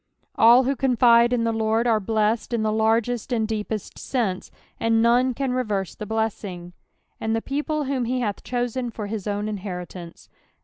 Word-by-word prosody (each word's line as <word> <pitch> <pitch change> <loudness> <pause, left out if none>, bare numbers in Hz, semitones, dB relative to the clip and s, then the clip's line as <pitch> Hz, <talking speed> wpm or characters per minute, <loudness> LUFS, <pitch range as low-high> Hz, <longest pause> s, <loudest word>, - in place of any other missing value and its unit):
All 235 +3 +6
who 275 +2 0
contido 240 -2 +4
in 245 -2 +1
the 230 0 0
I^ord 220 +1 +1
are 225 -2 +3
blessed 220 +3 0
in 230 -2 0
the 215 - +1
largest 225 +3 +1
and 225 -3 +1
deepest 215 -1 -4
sense, 220 -8 -2 0.3
and 225 0 +2
none 245 +2 +3
can 270 0 -1
reverw 210 -7 -2
the 210 - -7
blesFJng. 200 -5 -3 0.5
"And 220 0 -1
the - - +1
people 295 +4 -2
whom 270 -1 -1
be 255 +2 -1
hath 210 -5 -3
ehoten 245 0 -2
fvr 210 -2 -6 0.2
hi* 210 - -1
own 205 +1 -2
inheritanee. 180 -4 -7
225 Hz, 175 wpm, -24 LUFS, 210-245 Hz, 0.5 s, All